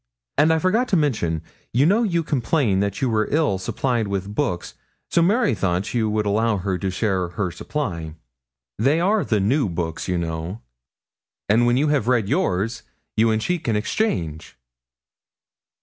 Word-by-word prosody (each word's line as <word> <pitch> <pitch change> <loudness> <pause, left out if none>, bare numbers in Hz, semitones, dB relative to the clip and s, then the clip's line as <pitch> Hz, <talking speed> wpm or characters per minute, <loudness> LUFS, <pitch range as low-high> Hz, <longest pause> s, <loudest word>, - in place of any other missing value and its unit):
And 155 +2 +4
I 160 - +3
forgot 205 +9 +2
to 190 - +2
mention 85 - 0 0.3
you 130 +5 +4
know 205 +8 +4
you 170 -7 +1
complained 125 -8 +1
that 100 +6 -2
you - - +3
were 110 -1 +1
ill 145 -11 +1
supplied 115 +3 -1
with 100 0 -3
books, 110 -9 -2 0.4
so 170 - +3
Mary 210 - +3
thought 95 0 -1
you 115 -3 +1
would 105 0 0
allow 105 +1 +1
her 95 -1 -2
to 95 - -1
share 95 -2 0
her 90 +1 -3
supply 85 - -4 0.6
they 140 +7 +3
are 200 +4 +2
the 110 - +1
new 115 +4 +2
books, 85 -1 -3
you 90 -1 0
know 85 +4 -4 0.8
and 115 +4 +4
when 120 +1 +3
you 150 +3 +2
have 140 -7 +1
read 120 -5 +2
yours, 100 +5 0 0.3
you 115 +1 +4
and 110 0 +1
she 180 -1 0
can 115 -8 -1
exchange.' 95 - -2
110 Hz, 170 wpm, -22 LUFS, 95-145 Hz, 0.8 s, And